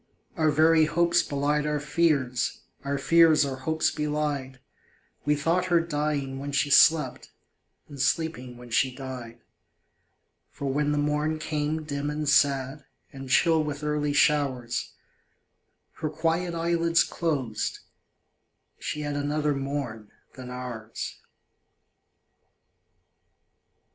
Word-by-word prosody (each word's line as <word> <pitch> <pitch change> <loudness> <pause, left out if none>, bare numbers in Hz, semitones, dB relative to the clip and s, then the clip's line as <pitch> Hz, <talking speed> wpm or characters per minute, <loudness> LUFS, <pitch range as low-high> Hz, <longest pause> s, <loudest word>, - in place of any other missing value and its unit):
Our 155 -1 +2
very 160 +1 +4
hopes 170 +2 +2
belied 145 +1 -1
our 150 0 0
fears, 145 -5 0 0.2
Our 140 0 -1
fears 160 +1 +5
our 135 -1 -4
hopes 160 +4 0
belied 150 -3 -2 0.7
We 150 0 +3
thought 165 +5 +1
her 175 -2 +3
dying 150 -4 -2
when 140 +1 -5
she 140 +1 +1
slept, 160 +2 +4 0.6
And 140 -3 -7
sleeping 130 -5 -1
when 120 -1 -12
she 130 +2 +1
died. 125 -4 -8 1.1
For 140 - -8
when 150 +1 +1
the 150 - 0
morn 150 +2 0
came 155 0 -2
dim 145 -1 -3
and 150 0 -3
sad, 140 0 +2 0.3
And 135 -1 -8
chill 160 +3 +4
with 150 -1 -5
early 150 -1 0
showers, 140 -5 +1 1.1
Her 155 - -2
quiet 165 +3 -1
eyelids 170 0 +2
closed 135 -10 -2 1.0
she 150 - -4
had 145 -1 -3
Another 145 +1 0
morn 135 -6 -4 0.2
than 130 -1 -9
ours. 125 -3 -6
150 Hz, 115 wpm, -26 LUFS, 135-155 Hz, 1.1 s, fears